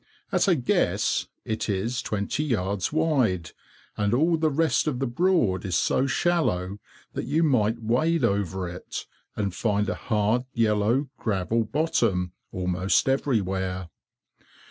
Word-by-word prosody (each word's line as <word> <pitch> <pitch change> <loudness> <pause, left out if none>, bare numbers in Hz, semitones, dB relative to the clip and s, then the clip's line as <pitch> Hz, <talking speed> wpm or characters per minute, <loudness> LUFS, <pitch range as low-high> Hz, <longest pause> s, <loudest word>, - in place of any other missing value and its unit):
At - - +2
a 185 - +5
guess, 125 -5 +1 0.2
it 110 0 -2
is 110 +6 -1
twenty 105 +6 -2
yards 100 -8 -1
wide, 130 - +1 0.4
and 105 +2 +1
all 165 +6 +3
the 160 -1 +1
rest 160 +2 +1
of 145 -5 0
the 135 - -1
Broad 120 - +1
is 95 -3 -2
so 130 +9 +2
shallow 105 - 0 0.3
that - - -3
you 150 +6 +1
might 115 -6 +2
wade 145 +8 +1
over 95 -4 0
it, 90 +1 -6 0.3
and 100 -3 -2
find 105 0 0
a - - 0
hard, 110 +2 0
yellow, 115 +4 +2
gravel 110 +2 0
bottom 115 - 0 0.2
almost 90 +3 +1
everywhere. 95 -9 0
110 Hz, 135 wpm, -26 LUFS, 95-140 Hz, 0.4 s, a